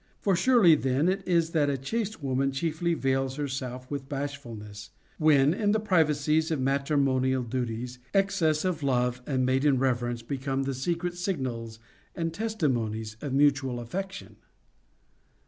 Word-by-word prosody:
For 195 -2 +2
surely 220 -4 +5
then 135 +1 +1
it 190 +2 +1
is 170 -2 +2
that 150 -3 +2
a 140 - 0
chaste 215 - -3
woman 135 0 0
chiefly 165 +4 -1
vails 135 -2 0
herself 130 -3 -5
with 135 -2 -5
bashfulness, 120 -8 -6 0.3
when, 150 -2 +5
in 205 +1 +1
the 220 - +2
privacies 160 -5 +2
of 160 -4 -1
matrimonial 135 -1 +1
duties, 120 0 -4
excess 195 -5 +2
of 175 -4 -1
love 125 -2 0
and 130 -3 +1
maiden 135 +2 +3
reverence 120 -2 0
become 135 +2 -2
the 135 0 -2
secret 170 +6 -2
signals 125 - -3 0.4
and 165 -1 -2
testimonies 120 - -2
of 140 - -4
mutual 135 -3 +2
affection. 190 +12 -6
140 Hz, 140 wpm, -28 LUFS, 130-165 Hz, 0.4 s, surely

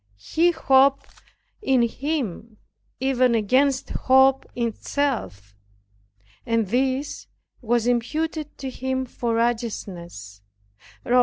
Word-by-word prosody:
He 340 +2 +4
hoped 275 -4 +2 0.4
in 265 - +3
Him 235 - -3 0.4
even 255 -2 +2
against 260 +5 +1
hope 265 +1 +3
itself, 230 - -2 0.9
and 230 -1 +1
this 265 +4 -1 0.3
was 235 -1 +1
imputed 300 +6 -2
to 265 -1 -5
him 260 0 -2
for 235 -2 -3
righteousness, 185 - -3 0.6
(Rom. 250 +1 +4
250 Hz, 90 wpm, -23 LUFS, 230-270 Hz, 0.9 s, He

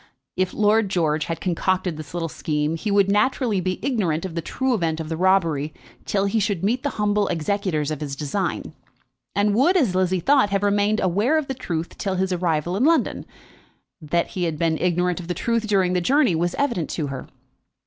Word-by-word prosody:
If 185 0 0
Lord 215 0 +2
George 155 -4 0
had 165 - -4
concocted 185 0 0
this 155 +1 -9
little 170 -1 -1
scheme, 150 0 -2
he 210 +6 -4
would 200 -1 +4
naturally 215 -1 +1
be 185 0 -1
ignorant 190 - 0
of 185 - -5
the 170 - -2
true 260 +9 -1
event 165 -7 -1
of 160 -1 -5
the 165 - -2
robbery 165 -5 +1 0.3
till 200 -1 0
he 200 +3 +1
should 200 -4 -1
meet 235 +6 +1
the 285 - -1
humble 210 -1 +1
executors 170 -3 -1
of 155 - -4
his 140 -2 -4
design, 150 +7 -3 0.6
and 205 0 +2
would, 285 - +4
as 250 - +2
Lizzie 185 0 +1
thought, 270 +1 +3
have 200 0 0
remained 205 +1 +2
unaware 205 - +2
of 310 -3 -1
the 270 - -2
truth 170 -10 -5
till 195 -2 -1
his 190 0 0
arrival 175 -1 0
in 215 - +1
London. 330 +2 +2 0.7
That 165 +3 0
he 180 -2 -2
had 160 -2 -2
been 160 0 0
ignorant 180 0 +1
of 170 - -8
the 180 - -2
truth 230 +3 -1
during 190 -3 +2
the 180 - +1
journey 265 - +3
was 170 +2 0
evident 240 - -1
to 155 - -2
her. 135 - -6
185 Hz, 205 wpm, -23 LUFS, 165-210 Hz, 0.7 s, would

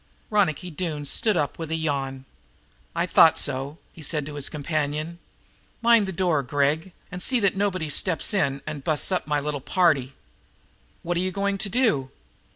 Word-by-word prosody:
Ronicky 180 -4 +1
Doone 155 -3 -4
stood 210 +6 +2
up 145 -1 -1
with 165 -2 -5
a 160 - -1
yawn. 135 -4 -2 0.7
"I - - +1
thought - - +6
so," 135 +4 -1 0.2
he 165 - -13
said 150 -1 -2
to 150 - -7
his 145 -2 -4
companion. 155 +2 -3 0.6
"Mind 230 -3 +4
the - - -3
door, 175 -5 +1
Gregg, 145 +6 0 0.2
and 180 - -5
see 255 +6 +5
that 200 -2 +2
nobody 190 -5 0
steps 180 +6 0
in 140 -8 0
and 145 -3 -6
busts 155 +5 +2
up 185 - -1
my 150 -1 +1
little 145 -1 -3
party." 145 -6 +2 0.9
"What 175 0 -1
are - - +1
you 185 0 -1
going 200 +1 -1
to 200 - 0
do?" 215 - +1
160 Hz, 175 wpm, -25 LUFS, 145-185 Hz, 0.9 s, thought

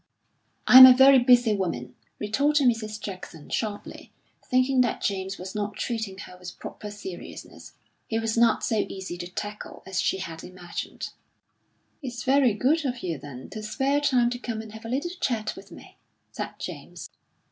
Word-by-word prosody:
"I'm 260 +1 +12
a 255 - +8
very 265 +1 +7
busy 245 -2 +5
woman," 165 -11 -3 0.2
retorted 280 +6 +2
Mrs. 215 -2 -1
Jackson 185 -7 -9
sharply, 210 -2 -4 0.3
thinking 255 0 +2
that 240 - 0
James 190 -1 -2
was 185 +1 -8
not 210 -1 -3
treating 220 -3 -3
her 180 -2 -10
with 180 -1 -9
proper 210 - -8
seriousness. 195 -4 -10 0.3
He 225 - -1
was 225 -1 -1
not 235 0 +3
so 225 - 0
easy 190 -2 -6
to 175 - -5
tackle 205 +3 -7
as 190 -1 -2
she - - 0
had 165 -4 -7
imagined. 180 -1 -7 0.9
"It's 245 -3 -6
very 265 -4 +3
good 295 +9 +2
of 250 -3 -3
you, 165 -5 -3
then, 130 -3 -10
to 215 - -6
spare 270 +7 0
time 250 -4 +2
to 245 - -4
come 230 -3 -4
and 220 - -11
have 220 +1 -11
a - - -6
little 285 +8 -2
chat 220 -4 -1
with - - -13
me," - - -14 0.3
said - - -5
James. - - -8
220 Hz, 170 wpm, -26 LUFS, 190-250 Hz, 0.9 s, I'm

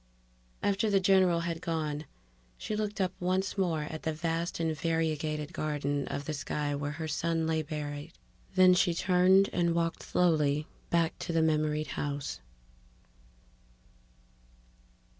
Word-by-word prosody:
After 205 +2 +2
the 200 -1 +4
general 185 -3 +4
had 170 -1 -3
gone, 155 -3 -2 0.5
she 215 - -4
looked 210 0 -3
up 185 -1 +1
once 185 +2 0
more 170 -6 0
at 155 +1 -6
the 160 - -1
vast 165 +2 -2
and 160 -1 0
variegated 155 -1 -1
garden 145 -2 -1
of 140 - -4
the 155 - -3
sky 145 0 -2
where 145 +1 -3
her 160 +1 -4
son 165 +2 0
lay 160 0 +1
buried, 150 +1 -5 0.4
then 185 -1 +7
she 175 -1 +3
turned 185 +2 +4
and 170 -1 +1
walked 165 -1 0
slowly 150 -4 +2 0.2
back 165 -1 +1
to - - -4
the 165 -1 +3
memoried 155 -1 +1
house. 145 -1 -3
160 Hz, 140 wpm, -30 LUFS, 150-180 Hz, 0.5 s, then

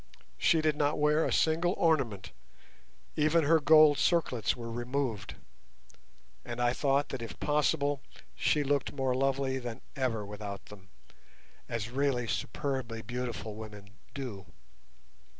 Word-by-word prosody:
She 160 - +4
did 155 -1 +1
not 145 0 +1
wear 150 +2 +3
a - - -1
single 165 +3 +2
ornament, 130 - +1 0.8
even 155 +2 +3
her 160 +3 +5
gold 155 -1 +6
circlets 140 - +1
were 115 -1 -6
removed, 120 -4 -3 1.1
and 120 0 -6
I 120 0 +2
thought 140 +1 +1
that 135 - -5
if 115 - -7
possible 145 -1 +1 0.3
she 150 - +1
looked 140 -1 0
more 135 -2 0
lovely 135 0 0
than 120 -2 -6
ever 115 -6 -1
without 100 -1 -7
them, 95 -2 -14 0.8
as 115 -1 -3
really 135 -2 0
superbly 115 - -3
beautiful 120 -2 -4
women 105 -2 -10 0.2
do. 125 -9 -6
130 Hz, 130 wpm, -30 LUFS, 115-145 Hz, 1.1 s, gold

